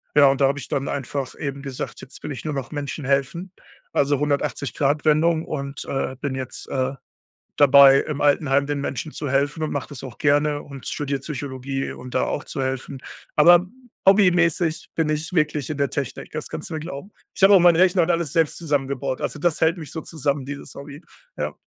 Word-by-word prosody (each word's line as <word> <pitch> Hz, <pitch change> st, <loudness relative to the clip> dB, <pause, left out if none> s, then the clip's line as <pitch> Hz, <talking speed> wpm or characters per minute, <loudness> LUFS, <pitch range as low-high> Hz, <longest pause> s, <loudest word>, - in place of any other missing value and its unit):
Ja, 145 Hz, -1 st, +7 dB
und 135 Hz, +1 st, +2 dB
da 135 Hz, -, +6 dB
habe 140 Hz, +1 st, -1 dB
ich -, -, -8 dB
dann 135 Hz, 0 st, -1 dB
einfach 140 Hz, 0 st, -3 dB
eben 140 Hz, -1 st, -4 dB
gesagt: 135 Hz, -2 st, -6 dB
„Jetzt 135 Hz, -, -12 dB
will -, -, -4 dB
ich 130 Hz, +2 st, -7 dB
nur 155 Hz, -, -2 dB
noch 135 Hz, -1 st, -4 dB
Menschen 145 Hz, 0 st, -4 dB
helfen.“ 140 Hz, +7 st, -1 dB, 0.4 s
Also 145 Hz, -1 st, +2 dB
180-Grad-Wendung 150 Hz, +3 st, +1 dB
und, 140 Hz, -2 st, -5 dB
äh, 135 Hz, -1 st, -2 dB
bin 140 Hz, -2 st, -2 dB
jetzt, 130 Hz, -1 st, -7 dB
äh, 130 Hz, 0 st, -1 dB, 0.6 s
dabei 140 Hz, -1 st, +8 dB
im 150 Hz, -2 st, -4 dB
Altenheim 140 Hz, -1 st, +2 dB
den 145 Hz, -1 st, -2 dB
Menschen 140 Hz, +3 st, -4 dB
zu 145 Hz, -3 st, -4 dB
helfen 140 Hz, +4 st, 0 dB
und 155 Hz, -, -2 dB
mache 140 Hz, -, -3 dB
das 140 Hz, -4 st, -9 dB
auch 125 Hz, -3 st, -8 dB
gerne 145 Hz, 0 st, +2 dB
und 140 Hz, -2 st, -10 dB
studiere 140 Hz, -2 st, -2 dB
Psychologie 135 Hz, -1 st, -4 dB
um 125 Hz, -, -10 dB
da -, -, +1 dB
auch 145 Hz, -, -3 dB
zu 135 Hz, -, -4 dB
helfen. 130 Hz, +1 st, -3 dB, 0.4 s
Aber 175 Hz, +3 st, +7 dB, 0.4 s
hobbymäßig 175 Hz, -4 st, +3 dB
bin 160 Hz, -2 st, +1 dB
ich 155 Hz, +2 st, -2 dB
wirklich 150 Hz, -4 st, 0 dB
in 155 Hz, -, -3 dB
der 140 Hz, -1 st, +1 dB
Technik. 140 Hz, -3 st, -5 dB
Das 155 Hz, -1 st, -5 dB
kannst 155 Hz, -, -6 dB
du 165 Hz, -, -6 dB
mir 155 Hz, -, -4 dB
glauben. 165 Hz, +4 st, -7 dB, 0.2 s
Ich -, -, -9 dB
habe 200 Hz, +1 st, +8 dB
auch -, -, +7 dB
meinen 175 Hz, -2 st, +6 dB
Rechner 185 Hz, +1 st, +4 dB
und 175 Hz, -, +1 dB
alles 165 Hz, -3 st, -1 dB
selbst 165 Hz, -3 st, +2 dB
zusammengebaut. 140 Hz, -4 st, -2 dB
Also, -, -, -3 dB
das 170 Hz, 0 st, 0 dB
hält 160 Hz, +3 st, +3 dB
mich 155 Hz, -5 st, -8 dB
so 160 Hz, -, -5 dB
zusammen, 145 Hz, -4 st, -2 dB
dieses 140 Hz, -1 st, -8 dB
Hobby, 140 Hz, +2 st, -9 dB, 0.4 s
ja. -, -, -3 dB
145 Hz, 205 wpm, -23 LUFS, 135-155 Hz, 0.6 s, dabei